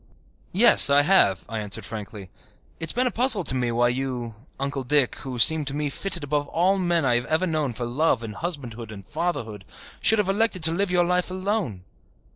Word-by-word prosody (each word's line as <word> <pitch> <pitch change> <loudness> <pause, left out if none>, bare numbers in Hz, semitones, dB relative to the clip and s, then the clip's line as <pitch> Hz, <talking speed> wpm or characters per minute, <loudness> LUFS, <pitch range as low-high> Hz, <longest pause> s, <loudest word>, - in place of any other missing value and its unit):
"Yes, 220 -4 +6
I 140 +1 +4
have," 145 - +2
I 115 -1 -5
answered 105 -2 -3
frankly. 105 -3 -8 0.5
"It 165 - -4
has - - -6
been 250 +1 +1
a 250 - 0
puzzle 235 -5 +2
to 130 - -4
me 125 -2 -1
why 120 +1 +2
you, 125 -2 -4 0.3
Uncle 140 0 -3
Dick, 130 -2 +1
who 130 -2 -7
seem 155 +6 +6
to 135 0 -4
me 145 -1 -2
fitted 180 -2 -4
above 145 0 -2
all 185 +5 +1
men 175 -4 0
I 125 - +2
have 120 0 -1
ever 160 +4 0
known 155 -7 -2
for 120 +1 -5
love 125 +1 0
and 110 -2 -7
husbandhood 120 -7 -6
and 100 -3 -11
fatherhood, 115 - -4 0.4
should 220 - +3
have 210 -3 0
elected 195 -2 0
to 160 - +9
live 195 +3 -1
your 180 -1 +2
life 180 +1 0
alone." 185 - -3
145 Hz, 210 wpm, -24 LUFS, 120-180 Hz, 0.5 s, to